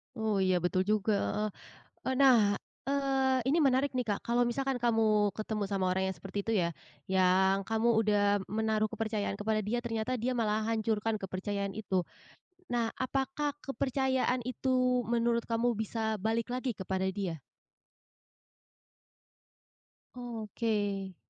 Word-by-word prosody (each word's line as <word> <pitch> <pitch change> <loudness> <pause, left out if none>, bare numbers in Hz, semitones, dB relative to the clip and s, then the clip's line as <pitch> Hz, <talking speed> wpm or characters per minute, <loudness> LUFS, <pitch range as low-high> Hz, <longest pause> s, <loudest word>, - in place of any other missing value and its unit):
Oh, 220 -3 0
iya 185 -1 +3
betul 185 +1 +1
juga, 215 0 +2 0.2
heeh, 215 0 0 0.5
eee, 260 - 0
nah, 230 -7 +5 0.2
eee, 270 -1 +1
ini 290 +5 +3
menarik 270 0 +2
nih 250 - +1
Kak 205 -3 -1
kalau 240 +1 +3
misalkan 265 +3 -1
kamu 220 -4 +2
ketemu 215 0 -3
sama 190 -2 +1
orang 185 +1 +1
yang - - -9
seperti 195 +3 -4
itu 225 - -2
ya, 170 -6 +1 0.3
yang 190 +1 +3
kamu 225 +3 +2
udah 205 -2 +2
menaruh 215 0 0
kepercayaan 215 -3 -2
kepada 215 0 0
dia 225 +4 -1
ternyata 235 +1 -2
dia 250 +3 -1
malah 215 -2 0
hancurkan 225 -1 0
kepercayaan 200 0 -3
itu, 190 -4 0 0.6
nah 235 -4 0
apakah 270 +2 -1
kepercayaan 260 -1 0
itu 255 -1 +1
menurut 235 0 +1
kamu 235 +1 +1
bisa 220 0 -2
balik 225 +4 -1
lagi 250 -2 -2
kepada 190 0 -2
dia? 185 -6 -3 2.8
Oke. 215 -5 -2
220 Hz, 130 wpm, -31 LUFS, 205-245 Hz, 2.8 s, nah